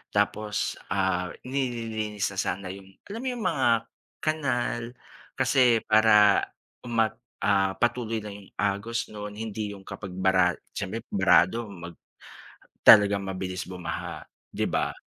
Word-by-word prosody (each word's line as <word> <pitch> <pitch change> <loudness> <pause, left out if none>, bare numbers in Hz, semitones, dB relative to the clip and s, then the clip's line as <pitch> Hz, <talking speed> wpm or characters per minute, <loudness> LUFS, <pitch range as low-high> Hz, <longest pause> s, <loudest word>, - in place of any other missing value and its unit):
tapos, 105 0 0
ah, 90 -1 +1 0.2
nililinis 115 -6 -2
na 95 - -11
sana 95 +1 -3
'yung, 95 0 -12 0.2
alam 215 +3 -6
mo - - -3
'yung 240 -3 -5
mga 135 - +1 0.6
kanal 130 -6 0 0.6
kasi 125 -4 +4
para 110 0 +6 0.7
umah 115 -2 +2 0.3
ah, 100 -1 +2
patuloy 120 -2 0
na 105 - -7
yung 100 -1 -11
agos 105 +4 -1
noon 105 -1 -7
hindi 110 -1 -4
'yung 100 - -11
kapag 100 -3 -7
bara 95 -1 +3 0.2
siyempre 100 +3 -3
barado 95 +3 +3
mag 85 -3 -9 0.9
talagang 100 -2 +8
mabilis 95 -1 -4
bumaha, 90 -3 -5 0.3
'di - - 0
ba? - - 0
105 Hz, 125 wpm, -27 LUFS, 95-115 Hz, 0.9 s, talagang